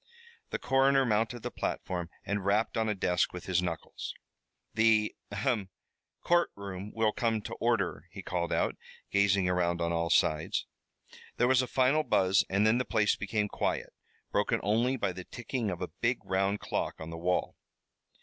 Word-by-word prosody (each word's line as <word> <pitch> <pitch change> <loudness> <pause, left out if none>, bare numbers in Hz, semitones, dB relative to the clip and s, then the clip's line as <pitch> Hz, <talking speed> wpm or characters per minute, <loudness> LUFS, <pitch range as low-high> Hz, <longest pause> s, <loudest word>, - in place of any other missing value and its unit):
The - - -2
coroner 135 +1 +3
mounted 115 +1 0
the - - -3
platform 90 -2 -3 0.2
and 100 +1 -1
rapped 105 +3 +1
on 110 -1 +1
a 105 - 0
desk 90 -2 +1
with 90 - -7
his 90 -1 +1
knuckles. 85 -3 -5 0.6
"The 110 -1 +3 0.2
ahem! 100 -1 -1 0.5
courtroom 100 - 0
will 110 -1 +2
come 115 -1 0
to - - -6
order!" 115 -8 0
he 95 +2 -9
called 85 -1 -2
out, - - 0 0.3
gazing 100 -2 +3
around 85 -1 +1
on 85 0 0
all 85 0 0
sides. 75 0 +2 0.7
There 120 - +3
was 130 0 +5
a 125 - -2
final 130 +5 +3
buzz 95 -9 +3
and 100 +2 +2
then 110 +3 +4
the - - +1
place 110 -4 +2
became 105 +1 -1
quiet, - - -2 0.4
broken - - +1
only 115 +6 +2
by 100 -5 0
the 90 +1 -7
ticking 120 -2 -3
of 90 -1 -4
a 90 - -4
big 120 +1 0
round 95 +2 +1
clock - - -2
on 80 +1 -7
the - - -5
wall. 90 +1 0
100 Hz, 170 wpm, -30 LUFS, 90-115 Hz, 0.7 s, was